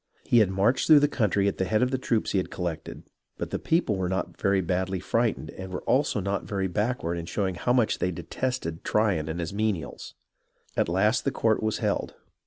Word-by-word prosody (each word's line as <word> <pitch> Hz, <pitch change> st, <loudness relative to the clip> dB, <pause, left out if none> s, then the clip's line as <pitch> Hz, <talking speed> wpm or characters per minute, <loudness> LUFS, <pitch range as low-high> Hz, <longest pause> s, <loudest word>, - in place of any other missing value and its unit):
He 120 Hz, -, +4 dB
had 105 Hz, -4 st, +4 dB
marched 100 Hz, +7 st, +2 dB
through 155 Hz, -2 st, +8 dB
the 145 Hz, -, +5 dB
country 105 Hz, -7 st, +1 dB
at 100 Hz, -, -2 dB
the 95 Hz, -, +1 dB
head 110 Hz, +5 st, +2 dB
of 125 Hz, -, +1 dB
the 130 Hz, -, 0 dB
troops 115 Hz, -4 st, 0 dB
he 100 Hz, -, +2 dB
had 95 Hz, -, -3 dB
collected, 85 Hz, -4 st, -5 dB, 0.3 s
but -, -, -5 dB
the -, -, -2 dB
people 160 Hz, -, +1 dB
were 90 Hz, -1 st, -1 dB
not 95 Hz, +1 st, -2 dB
very 100 Hz, 0 st, +3 dB
badly 95 Hz, +1 st, -1 dB
frightened 115 Hz, +5 st, -1 dB
and 95 Hz, 0 st, -8 dB
were 90 Hz, -, -5 dB
also 135 Hz, -4 st, +2 dB
not 100 Hz, 0 st, -2 dB
very 95 Hz, -2 st, -2 dB
back 105 Hz, +8 st, -1 dB
ward 85 Hz, +1 st, -1 dB
in 85 Hz, -, -7 dB
showing 95 Hz, 0 st, -1 dB
how 120 Hz, +7 st, 0 dB
much 120 Hz, -3 st, +2 dB
they 90 Hz, -, +1 dB
detested 85 Hz, +1 st, -3 dB
Tryon 100 Hz, -8 st, +1 dB
and 80 Hz, +2 st, -3 dB
his 85 Hz, +1 st, -3 dB
menials. 105 Hz, -5 st, -3 dB, 0.6 s
At -, -, +1 dB
last 105 Hz, +7 st, +2 dB
the -, -, +1 dB
court 110 Hz, -4 st, +1 dB
was 110 Hz, 0 st, 0 dB
held. -, -, -1 dB
100 Hz, 220 wpm, -27 LUFS, 90-115 Hz, 0.6 s, through